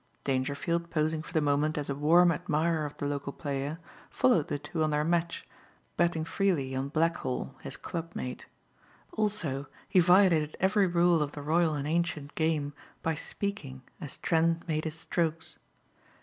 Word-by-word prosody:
Dangerfield 145 Hz, +6 st, -1 dB
posing 155 Hz, -1 st, 0 dB
for 160 Hz, -, -11 dB
the 160 Hz, -2 st, +2 dB
moment 150 Hz, +1 st, +1 dB
as 145 Hz, -, -2 dB
a 140 Hz, -, -1 dB
warm 170 Hz, +5 st, +5 dB
admirer 160 Hz, -1 st, 0 dB
of 145 Hz, -, -12 dB
the -, -, -3 dB
local 140 Hz, -1 st, -2 dB
player, 140 Hz, +2 st, -3 dB, 0.3 s
followed 240 Hz, -, +3 dB
the -, -, -2 dB
two 160 Hz, +2 st, -3 dB
on 155 Hz, -, +2 dB
their 150 Hz, 0 st, +1 dB
match, 170 Hz, +1 st, -1 dB, 0.5 s
betting 170 Hz, -2 st, +1 dB
freely 165 Hz, -7 st, 0 dB
on 135 Hz, +1 st, -2 dB
Blackhall, 155 Hz, -4 st, -1 dB
his -, -, -6 dB
clubmate. 165 Hz, -7 st, -5 dB, 0.6 s
Also, 170 Hz, -11 st, 0 dB, 0.2 s
he 195 Hz, -, +4 dB
violated 175 Hz, -4 st, +4 dB
every 195 Hz, +1 st, +3 dB
rule 175 Hz, -1 st, +3 dB
of 145 Hz, -1 st, -2 dB
the 145 Hz, -, -7 dB
royal 160 Hz, +1 st, +2 dB
and 145 Hz, 0 st, -3 dB
ancient 160 Hz, -3 st, -1 dB
game 155 Hz, -3 st, 0 dB, 0.3 s
by 165 Hz, -, +1 dB
speaking 150 Hz, -6 st, -5 dB, 0.2 s
as 150 Hz, -7 st, -6 dB
Trent 165 Hz, 0 st, +1 dB
made 155 Hz, -1 st, -1 dB
his 160 Hz, 0 st, -3 dB
strokes. 160 Hz, -1 st, -2 dB
160 Hz, 160 wpm, -29 LUFS, 145-170 Hz, 0.6 s, warm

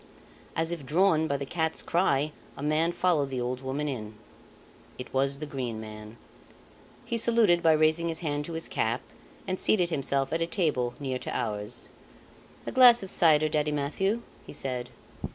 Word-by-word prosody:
As 165 Hz, +1 st, 0 dB
if 170 Hz, -4 st, -4 dB
drawn 160 Hz, +2 st, +3 dB
by 140 Hz, -, 0 dB
the 140 Hz, -, -4 dB
cat's 160 Hz, +2 st, -2 dB
cry 155 Hz, -4 st, +1 dB, 0.3 s
a 140 Hz, -, -6 dB
man 155 Hz, +3 st, +2 dB
followed 170 Hz, -6 st, +1 dB
the 130 Hz, -2 st, -3 dB
old 125 Hz, +1 st, -3 dB
woman 135 Hz, +3 st, -3 dB
in. 110 Hz, -6 st, -5 dB, 0.8 s
It 125 Hz, -, -9 dB
was 135 Hz, +1 st, +1 dB
the 155 Hz, -, -5 dB
Green 125 Hz, -6 st, -4 dB
Man. 110 Hz, 0 st, -9 dB, 0.9 s
He 235 Hz, 0 st, -1 dB
saluted 220 Hz, -7 st, +3 dB
by 160 Hz, -2 st, +5 dB
raising 155 Hz, +2 st, +2 dB
his 165 Hz, +1 st, -4 dB
hand 145 Hz, -2 st, -2 dB
to 170 Hz, -, -6 dB
his 165 Hz, 0 st, -3 dB
cap 115 Hz, +3 st, -1 dB, 0.5 s
and 185 Hz, 0 st, -2 dB
seated 180 Hz, -5 st, +2 dB
himself 135 Hz, -2 st, -1 dB
at 165 Hz, -, 0 dB
a 165 Hz, -, +1 dB
table 150 Hz, -10 st, 0 dB
near 130 Hz, -3 st, -3 dB
to -, -, -4 dB
ours. 105 Hz, -2 st, -4 dB, 0.8 s
"A -, -, -4 dB
glass 245 Hz, -4 st, +7 dB
of 190 Hz, -, -3 dB
cider, 155 Hz, -2 st, +4 dB
Daddy 150 Hz, 0 st, 0 dB
Mathieu," 190 Hz, +10 st, -1 dB, 0.2 s
he -, -, -11 dB
said. 125 Hz, -2 st, -4 dB
150 Hz, 175 wpm, -28 LUFS, 130-170 Hz, 0.9 s, glass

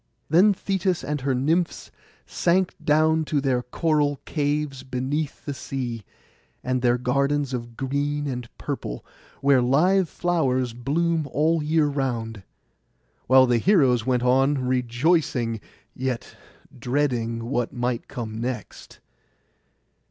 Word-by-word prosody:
Then 185 Hz, +6 st, +6 dB
Thetis 190 Hz, -2 st, -1 dB
and 150 Hz, -1 st, -3 dB
her 135 Hz, 0 st, 0 dB
nymphs 165 Hz, +7 st, 0 dB, 0.3 s
sank 180 Hz, +1 st, +1 dB
down 155 Hz, +1 st, +3 dB
to 150 Hz, -1 st, 0 dB
their 130 Hz, -3 st, +1 dB
coral 145 Hz, +1 st, 0 dB
caves 145 Hz, -2 st, -1 dB
beneath 130 Hz, +3 st, -3 dB
the 145 Hz, -, -3 dB
sea, 125 Hz, -5 st, -5 dB, 0.6 s
and 130 Hz, 0 st, -1 dB
their 120 Hz, 0 st, +3 dB
gardens 140 Hz, +2 st, 0 dB
of 120 Hz, -2 st, -5 dB
green 145 Hz, +2 st, -1 dB
and 125 Hz, -4 st, -4 dB
purple, -, -, -5 dB, 0.4 s
where 135 Hz, -2 st, +4 dB
live 165 Hz, +8 st, +3 dB
flowers 130 Hz, -9 st, 0 dB
bloom 155 Hz, +6 st, 0 dB
all 160 Hz, +4 st, +2 dB
the 150 Hz, -, -4 dB
year 160 Hz, -1 st, +3 dB
round; 120 Hz, -7 st, -2 dB, 0.9 s
while 130 Hz, +1 st, +7 dB
the 120 Hz, -2 st, +2 dB
heroes 135 Hz, -, +3 dB
went 125 Hz, 0 st, 0 dB
on 135 Hz, +2 st, +2 dB
rejoicing, 125 Hz, -, +1 dB, 0.3 s
yet 130 Hz, -2 st, -4 dB, 0.4 s
dreading 120 Hz, -3 st, -1 dB
what 120 Hz, -1 st, -1 dB
might 120 Hz, -1 st, -2 dB
come 110 Hz, -2 st, -6 dB
next. 120 Hz, -3 st, -6 dB
135 Hz, 120 wpm, -24 LUFS, 125-150 Hz, 0.9 s, while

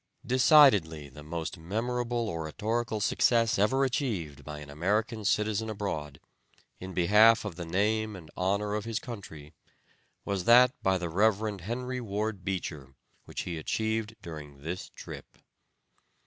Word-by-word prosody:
Decidedly 120 Hz, -, +5 dB
the 75 Hz, +2 st, -12 dB
most 80 Hz, +3 st, -5 dB
memorable 120 Hz, +6 st, -2 dB
oratorical 105 Hz, +7 st, -2 dB
success 115 Hz, +1 st, +2 dB
ever 130 Hz, +7 st, +3 dB
achieved 115 Hz, -, -2 dB
by 75 Hz, -1 st, -7 dB
an 75 Hz, -1 st, -9 dB
American 105 Hz, -, -1 dB
citizen 105 Hz, +2 st, +1 dB
abroad, 80 Hz, -10 st, -4 dB, 0.6 s
in 95 Hz, 0 st, -8 dB
behalf 105 Hz, +5 st, +5 dB
of 100 Hz, -5 st, -5 dB
the 85 Hz, -1 st, -6 dB
name 105 Hz, +4 st, 0 dB
and 80 Hz, -5 st, -12 dB
honor 100 Hz, +3 st, 0 dB
of 105 Hz, 0 st, -2 dB
his 115 Hz, -2 st, -2 dB
country, 90 Hz, -, -8 dB, 0.7 s
was 100 Hz, -3 st, -2 dB
that 125 Hz, +1 st, +7 dB
by 95 Hz, 0 st, +2 dB
the 90 Hz, -1 st, -3 dB
Rev. 105 Hz, +3 st, +1 dB
Henry 125 Hz, +6 st, -4 dB
Ward 105 Hz, -2 st, -3 dB
Beecher, 75 Hz, -8 st, -4 dB, 0.3 s
which -, -, -5 dB
he 85 Hz, -2 st, -4 dB
achieved 110 Hz, +5 st, -2 dB
during 75 Hz, -4 st, -9 dB
this 85 Hz, +4 st, -5 dB
trip. -, -, -11 dB
100 Hz, 135 wpm, -29 LUFS, 85-115 Hz, 0.7 s, that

